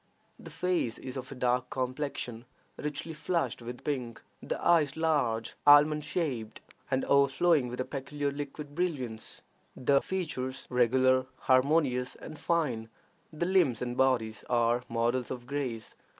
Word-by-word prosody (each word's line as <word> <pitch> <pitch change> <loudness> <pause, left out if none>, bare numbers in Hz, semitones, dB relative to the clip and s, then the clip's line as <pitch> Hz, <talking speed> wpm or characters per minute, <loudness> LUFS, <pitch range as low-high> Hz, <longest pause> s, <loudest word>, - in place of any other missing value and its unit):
The - - -10
face 180 -10 -1
is 130 -1 -7
of 130 0 -6
a - - -6
dark 125 0 0
complexion, 130 -2 -3 0.3
richly 150 +2 -4
flushed 155 -6 -1
with 120 +1 -8
pink; 125 -6 -3 0.2
the - - -3
eyes 160 -4 +4
large, 140 -9 +1
almond 150 +1 +7
shaped, 135 -9 -3 0.3
and 130 0 0
overflowing 140 +1 +4
with 125 +1 -6
a 130 - 0
peculiar 140 +1 -3
liquid 145 +1 -6
brilliance; 135 -10 -3 0.3
the 140 +2 +3
features 135 -8 -3
regular, 130 +1 +3
harmonious, 130 -1 +2
and 155 - -10
fine; 130 -10 0 0.4
the 155 +2 -2
limbs 175 - +3
and 120 -1 -3
bodies 125 -5 +1
are 120 0 +2
models 120 +2 0
of 125 -2 -6
grace. 130 -5 -4
130 Hz, 135 wpm, -30 LUFS, 125-150 Hz, 0.4 s, almond